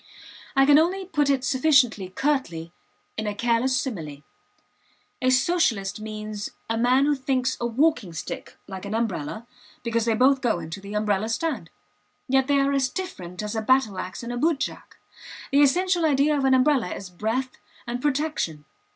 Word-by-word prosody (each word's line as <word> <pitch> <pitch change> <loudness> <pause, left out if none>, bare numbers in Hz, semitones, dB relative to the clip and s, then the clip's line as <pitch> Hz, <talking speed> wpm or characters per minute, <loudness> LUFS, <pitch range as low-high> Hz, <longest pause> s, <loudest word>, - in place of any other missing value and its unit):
I 270 0 +5
can 290 +1 +7
only 370 +4 0
put 295 -5 0
it 270 -2 +2
sufficiently 260 -9 +3
curtly 185 - -2 0.4
in 220 -1 -2
a 205 - -2
careless 240 +3 +1
simile. 160 - -5 1.0
A 255 - +3
Socialist 255 - +1
means 215 -1 -5 0.2
a 225 - -1
man 250 +4 +3
who 295 - +3
thinks 260 -1 0
a 240 - +1
walking 250 - +1
stick 160 - -7
like 190 -1 -7
an 205 +2 -4
umbrella 220 -1 -3 0.4
because 230 -1 0
they 230 -1 +2
both 260 +3 +4
go 235 -7 +1
into 165 +3 -7
the 200 +1 -7
umbrella 210 0 0
stand. 315 +7 -2 0.6
Yet 265 0 +2
they 285 -1 +3
are 275 0 +2
as 270 -2 +1
different 190 - -6
as 210 +1 -4
a 220 - 0
battle 220 -5 +2
ax 185 +5 -6
and 240 +1 -4
a - - -3
bootjack. 300 +1 -2 0.5
The 280 +1 +5
essential 350 +5 +3
idea 295 0 +3
of 275 -2 0
an 265 0 +5
umbrella 260 -3 +3
is 190 -2 -8
breadth 225 +8 -3 0.3
and 240 +1 -4
protection. 285 - -1
250 Hz, 170 wpm, -25 LUFS, 210-280 Hz, 1.0 s, can